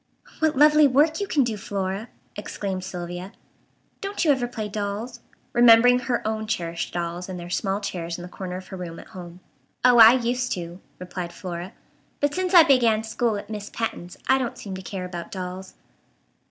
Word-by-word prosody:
"What 315 -3 +1
lovely 300 +1 +7
work 300 +4 +3
you 405 - -2
can 290 -7 +2
do, 225 -3 -2
Flora!" 195 +2 -4 0.3
exclaimed 195 -2 -4
Sylvia. 180 +2 -6 0.7
"Don't 395 -2 -2
you 300 - +5
ever 255 -3 +1
play 220 -3 -5
dolls?" 205 +3 -4 0.3
remembering 240 +1 +7
her 245 -3 -2
own 220 0 -2
cherished 170 -6 -3
dolls 175 +1 -4
in 185 - -5
their 175 0 -8
small 195 +1 -1
chairs 175 -4 -4
in 175 - -8
the - - -7
corner 180 0 -6
of 185 - -11
her 190 - -7
room 170 -2 -7
at - - -12
home. 175 -1 -10 0.4
"Oh, 245 -1 +7
I 225 +1 +10
used 250 0 0
to," 175 +1 -7 0.2
replied 180 -1 -6
Flora, 175 +2 -7 0.5
"but 290 0 +1
since 370 +1 0
I 340 - +11
began 240 -7 +3
school 225 0 -1
at 205 - -8
Miss 210 -1 -6
Patten's 180 -6 -5
I 265 0 +4
don't 250 -3 -3
seem 200 - -7
to 185 - -6
care 185 -1 -5
about 175 -2 -7
dolls." 185 0 -7
205 Hz, 190 wpm, -24 LUFS, 180-245 Hz, 0.7 s, I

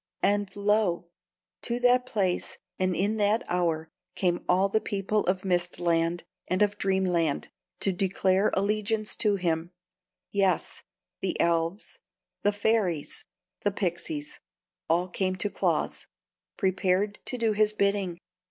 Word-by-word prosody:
And 205 -1 +2
lo! 200 -4 +1 0.5
to 240 0 -1
that 250 0 +4
place 190 -7 -1 0.2
and 185 -1 +1
in 205 +3 0
that 210 +3 +2
hour 165 -3 0 0.2
came 175 -2 0
all 185 +2 +4
the 220 +2 +1
people 205 +1 0
of 185 +1 0
Mist 175 -1 0
Land 170 0 +1 0.2
and 185 +3 +2
of 205 0 0
Dream 190 0 +1
Land 165 -5 0 0.3
to 195 - +2
declare 190 +1 +2
allegiance 210 +2 0
to 210 -2 +2
him: 170 -3 -1 0.6
yes, 195 -4 +1 0.4
the - - -2
elves, 170 +3 0 0.4
the 205 - +3
fairies, 205 -7 0 0.3
the 205 - +1
pixies, 205 - -3 0.5
all 175 +3 +2
came 185 +1 -1
to 200 +2 -1
Claus, - - -1 0.5
prepared 190 +1 +1
to 250 - -3
do 230 -2 +2
his 210 0 +3
bidding. 200 -4 0
195 Hz, 135 wpm, -28 LUFS, 175-210 Hz, 0.6 s, that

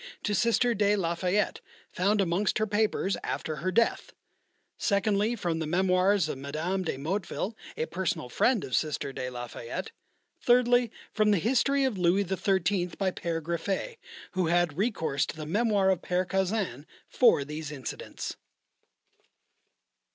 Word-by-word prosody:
to 210 - 0
Sister 235 +3 +3
de 205 -1 +3
la 170 -4 0
Fayette, 185 +4 0 0.3
found 200 +3 +2
amongst 190 +3 +1
her 215 - +1
papers 210 -2 0
after 155 -1 -3
her 185 +6 -1
death; 230 +5 +1 0.6
secondly, 205 +2 +1
from 170 -7 -2
the 160 - -2
memoirs 185 +3 +3
of 135 - -4
Mme. 160 +7 -2
de 165 -7 -3
Motteville, 190 +7 -3 0.2
a 155 - 0
personal 170 -7 -2
friend 235 - +2
of 130 - -2
Sister 145 -3 -1
de 130 -1 -4
la 120 -1 -5
Fayette; 120 +11 -6 0.5
thirdly, 245 -1 +4 0.2
from 215 -1 +3
the 205 - +4
History 265 - +2
of 250 -8 0
Louis 180 +3 +3
XIII., 190 -1 +1
by 190 -2 +1
P. 170 - -6
Griffet, 190 - -3 0.3
who 185 -3 0
had 175 -2 +2
recourse 180 - 0
to - - -6
the 155 - -5
memoir 200 +2 +2
of 185 - -1
Père 180 0 0
Caussin 190 - -1 0.2
for 235 - +4
these 150 +1 -6
incidents. 135 -4 -6
190 Hz, 150 wpm, -28 LUFS, 165-210 Hz, 0.6 s, thirdly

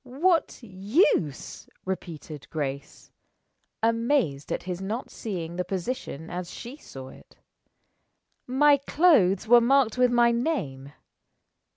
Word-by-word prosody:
"What 295 +3 0
use?" 195 - 0 0.2
repeated 160 -5 -6
Grace, 140 -3 -5 0.7
amazed 230 - +1
at - - -2
his 180 0 -5
not 215 +6 -4
seeing 175 -6 -5
the 180 - 0
position 180 - -5
as 180 0 -5
she 240 +7 -8
saw 130 - -10
it. - - -17 1.1
"My 285 +3 +4
clothes 275 - +3
were 240 +1 +7
marked 250 -1 +2
with 250 0 +5
my 240 -1 +4
name. 160 - -2
215 Hz, 110 wpm, -26 LUFS, 170-255 Hz, 1.1 s, were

